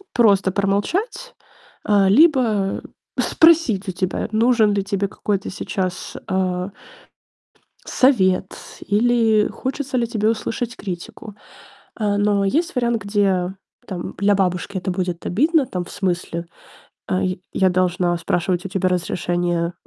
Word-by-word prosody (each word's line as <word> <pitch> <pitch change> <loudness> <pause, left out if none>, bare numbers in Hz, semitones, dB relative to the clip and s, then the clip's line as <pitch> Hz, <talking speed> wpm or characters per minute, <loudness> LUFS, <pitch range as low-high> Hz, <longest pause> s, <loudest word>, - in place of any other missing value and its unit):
просто 200 -5 +4
промолчать, 205 - -1 0.5
а, 200 -2 +3
либо 230 - +3 0.4
спросить 315 - +4
у 185 - -1
тебя, 185 +3 -2
нужен 220 -1 +3
ли 200 -1 0
тебе 200 0 -1
какой-то 195 0 -3
сейчас, 185 -1 -4
а 185 0 -1 1.1
совет, 190 -8 +2 0.3
или 220 0 +3
хочется 265 0 -4
ли 235 - +1
тебе 220 -2 0
услышать 230 +1 -3
критику. 200 +3 -7 0.6
А, 205 -2 0
но 205 -1 +2
есть 325 - 0
вариант, 235 -2 0
где 195 -3 +1 0.3
там 180 -2 -6
для 200 +1 +3
бабушки 190 0 -1
это 190 - -3
будет 180 -2 -3
обидно 300 - +2
там 180 -7 -4
в - - -12
смысле, 175 -2 -2 0.6
а: 185 - 0
"Й 185 -1 -2
я 190 -1 +3
должна 180 -1 +1
спрашивать 175 +1 -1
у 195 - -4
тебя 190 -1 0
разрешения 175 -1 -1
200 Hz, 125 wpm, -21 LUFS, 185-225 Hz, 1.1 s, просто